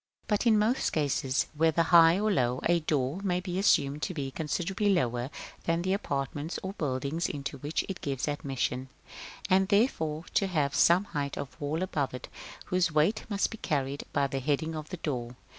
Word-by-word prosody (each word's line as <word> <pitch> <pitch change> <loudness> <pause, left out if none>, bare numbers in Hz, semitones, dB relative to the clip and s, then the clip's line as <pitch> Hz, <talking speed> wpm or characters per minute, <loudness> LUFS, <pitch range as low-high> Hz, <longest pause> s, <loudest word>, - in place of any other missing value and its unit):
But 210 +3 +1
in 220 -2 +6
most 220 +5 +2
cases, 140 -3 0
whether 160 +2 +3
high 165 +1 +6
or 215 +1 +1
low, 125 -7 +1
a 170 0 +4
door 150 0 -1
may 180 -3 0
be 180 0 -3
assumed 150 -7 +3
to 180 - -3
be 135 -3 -3
considerably 180 +8 -1
lower 125 -8 0 0.4
than 165 +1 +1
the 185 +1 +1
apartments 145 -2 -3
or 190 +1 -4
buildings 145 +1 -2
into 140 -1 -5
which 150 +2 -2
it 195 - -5
gives 135 -1 -2
admission, 135 -3 -2 0.6
and 190 +1 +4
therefore 170 - +1
to 195 - +2
have 150 -7 0
some 175 +3 +5
height 145 -8 -4
of 140 - -6
wall 155 +5 -1
above 145 -8 -2
it, 125 - -8 0.4
whose 180 -2 +1
weight 160 +9 +2
must 200 -2 0
be 225 - -8
carried 140 -1 -1
by 140 - +2
the 135 0 -2
heading 150 +4 -1
of 155 -1 -6
the 180 - -5
door. 125 -6 -4
155 Hz, 185 wpm, -29 LUFS, 140-185 Hz, 0.6 s, in